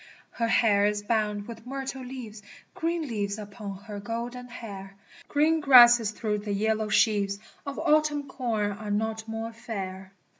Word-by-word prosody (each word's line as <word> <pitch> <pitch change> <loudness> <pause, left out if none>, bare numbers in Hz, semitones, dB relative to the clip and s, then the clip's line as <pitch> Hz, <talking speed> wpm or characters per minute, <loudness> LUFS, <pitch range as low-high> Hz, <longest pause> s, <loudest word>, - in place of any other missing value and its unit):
Her 230 - -1
hair 205 -3 +4
is 210 0 -1
bound 210 -2 -1
with 230 0 -10
myrtle 270 0 -5
leaves, 245 -5 -8 0.3
(Green 335 0 -1
leaves 205 -6 -2
upon 205 -1 -7
her 210 -2 -7
golden 235 +4 -5
hair 195 -5 -9 0.2
!) - - -20
Green 310 +2 +3
grasses 240 -6 +8
through 210 -1 -2
the 205 0 -3
yellow 215 +1 0
sheaves 205 -1 +2 0.3
Of 280 - -4
autumn 300 -2 +2
corn 220 -6 -1
are 210 +1 -7
not 220 +1 -1
more 225 +1 -4
fair. 195 -5 -6
220 Hz, 155 wpm, -27 LUFS, 205-245 Hz, 0.3 s, grasses